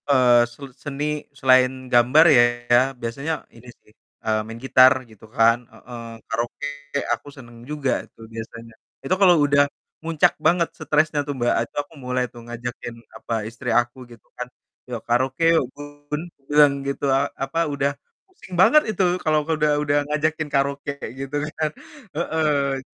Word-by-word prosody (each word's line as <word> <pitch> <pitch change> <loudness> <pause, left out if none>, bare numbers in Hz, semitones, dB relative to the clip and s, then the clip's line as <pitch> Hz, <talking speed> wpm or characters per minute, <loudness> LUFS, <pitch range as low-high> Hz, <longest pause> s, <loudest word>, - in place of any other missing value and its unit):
Eee, 125 -3 +5
sel 130 +4 -11 0.2
seni 145 -1 -4 0.4
selain 130 -1 +5 0.2
gambar 125 +7 +6
ya, 120 0 +3 0.2
biasanya 140 +7 -4
ini 120 +2 -15
sih, - - -26 0.3
eee, 110 -1 +1
main 115 +1 -8
gitar 130 0 +7 0.2
gitu 110 0 -16
kan 115 +1 +5
heeh, 120 +2 -10 0.3
karaoke 120 +5 -3 0.5
aku - - -6
senang 120 -4 -13
juga 145 -3 -1
itu - - -32
biasanya. 115 0 -9 0.3
Itu 160 - +1
kalau 180 -3 +7
udah 145 0 +4 0.4
muncak 160 -2 +2
banget 170 +1 +3
stresnya 155 0 +1
tuh, 145 - -2
Mbak, 120 -1 +1
ah, - - +1
itu - - -29
aku 145 +3 -17
mulai 125 0 0
tuh 120 - -11
ngajakin, 120 0 -6 0.2
apa, - - -6 0.2
istri 115 0 -6
aku 120 +2 +1
gitu 115 -3 -16
kan, - - -4 0.4
"Yuk, - - -4
karaoke 130 +6 +1
yuk 160 - +3
Bun!" 145 +1 -7 0.3
Bilang 145 -1 +6
gitu, 140 +1 -2
a 140 +1 +1
apa, 135 +5 -2
udah 140 0 0 0.3
pusing 375 - -15
banget 305 +10 +7
itu 195 -3 0 0.2
kalau 155 -1 +1
udah 155 -1 +1
udah 145 0 +1
ngajakin 155 +1 0
karaoke 140 0 0
kayak - - -7
gitu 135 +1 -5 0.2
kan, 155 -1 0 0.5
heeh. 150 -5 0
140 Hz, 160 wpm, -22 LUFS, 120-150 Hz, 0.5 s, gitar